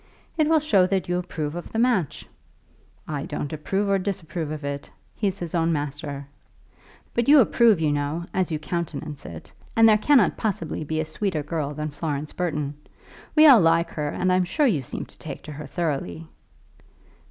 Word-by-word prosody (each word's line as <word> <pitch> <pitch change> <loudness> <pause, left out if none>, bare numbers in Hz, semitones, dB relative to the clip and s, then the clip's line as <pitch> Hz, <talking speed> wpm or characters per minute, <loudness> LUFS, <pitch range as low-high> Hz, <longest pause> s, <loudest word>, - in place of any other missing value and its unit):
"It 310 -2 +2
will 325 - +5
show 205 -12 +3
that 190 -1 -1
you 180 0 0
approve 155 -4 -4
of 175 0 -7
the - - -4
match." 225 - +1 0.8
"I 145 -2 -3
don't 145 - -4
approve 195 +7 -1
or 195 0 +2
disapprove 175 -4 -3
of 155 -1 -5
it. 140 0 -4 0.3
He's 200 -3 -1
his 175 -4 -5
own 165 -1 +2
master." 145 -1 -3 0.9
"But 235 -1 0
you 295 - +9
do 285 - +9
approve, 225 -4 +4
you 155 -2 +1
know, 145 +4 -2
as 185 -1 0
you 155 - -1
countenance 155 -2 -5
it; 80 -2 -10 0.2
and 225 0 +7
there 215 -1 +5
cannot 255 -5 +4
possibly 170 -8 -2
be 155 +1 -2
a 160 - 0
sweeter 160 -1 -2
girl 150 -2 -3
than 150 +1 -3
Florence 150 -1 -4
Burton. 150 -5 -2 0.6
We 310 0 +8
all 265 -8 +9
like 165 0 +3
her, 150 -1 -2
and 185 +4 0
I'm 185 0 +3
sure 240 - +1
you 190 - +2
seem 125 - -5
to - - -17
take 150 -3 -7
to 155 - -8
her 150 0 -7
thoroughly." 135 - -3
165 Hz, 190 wpm, -24 LUFS, 150-195 Hz, 0.9 s, you